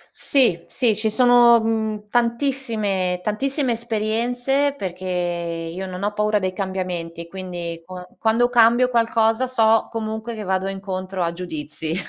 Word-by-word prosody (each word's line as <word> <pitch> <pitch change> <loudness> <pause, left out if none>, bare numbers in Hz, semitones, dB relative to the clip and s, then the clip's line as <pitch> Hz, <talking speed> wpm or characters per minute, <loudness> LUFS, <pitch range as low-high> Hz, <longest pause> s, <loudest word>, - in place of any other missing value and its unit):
Sì, 235 -12 +2
sì. 230 -5 +1
Ci 220 0 0
sono, 240 0 +6
mhmm, 220 -2 -2
tantissime 230 -7 0
tantissime 265 +5 -1
esperienze 240 +5 0
perché 185 -4 -6 0.7
io 190 +1 -4
non 185 0 -7
ho 205 +1 0
paura 210 0 +1
dei 185 -2 -2
cambiamenti, 180 -3 -4
quindi 175 -3 -6
qua 180 0 -9
quando 230 +2 +2
cambio 240 +1 +5
qualcosa 230 +1 +2
so 225 -3 +3
comunque 220 +1 -4
che 215 - -6
vado 190 0 -1
incontro 190 -1 -4
a 170 0 0
giudizi, 160 -2 -5
215 Hz, 135 wpm, -22 LUFS, 185-235 Hz, 0.7 s, sono